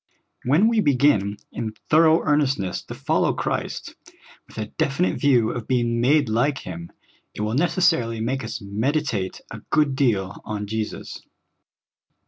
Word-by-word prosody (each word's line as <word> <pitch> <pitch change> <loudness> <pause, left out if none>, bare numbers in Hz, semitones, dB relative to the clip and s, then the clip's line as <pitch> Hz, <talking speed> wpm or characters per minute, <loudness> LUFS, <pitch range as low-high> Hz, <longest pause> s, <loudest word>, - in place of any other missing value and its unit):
When 150 - +4
we 230 -1 +2
begin 125 - +2
in 110 -2 -5 0.2
thorough 160 +1 +5
earnestness 140 -10 +1
to - - -8
follow - - +1
Christ, - - -3 0.5
with - - -17
a 110 - -2
definite 140 +10 -1
view 125 -7 +3
of 120 -3 -6
being 120 -2 +1
made 145 +2 +3
like 125 +6 +1
Him, 85 -2 -7 0.4
it - - -5
will 105 +1 -1
necessarily 155 -7 +2
make 130 +4 -2
us - - -5
meditate 110 0 -2
a - - -7
good 145 -3 +2
deal 105 -8 0
on 105 -1 -4
Jesus. 110 +1 -5
125 Hz, 140 wpm, -23 LUFS, 110-145 Hz, 0.5 s, thorough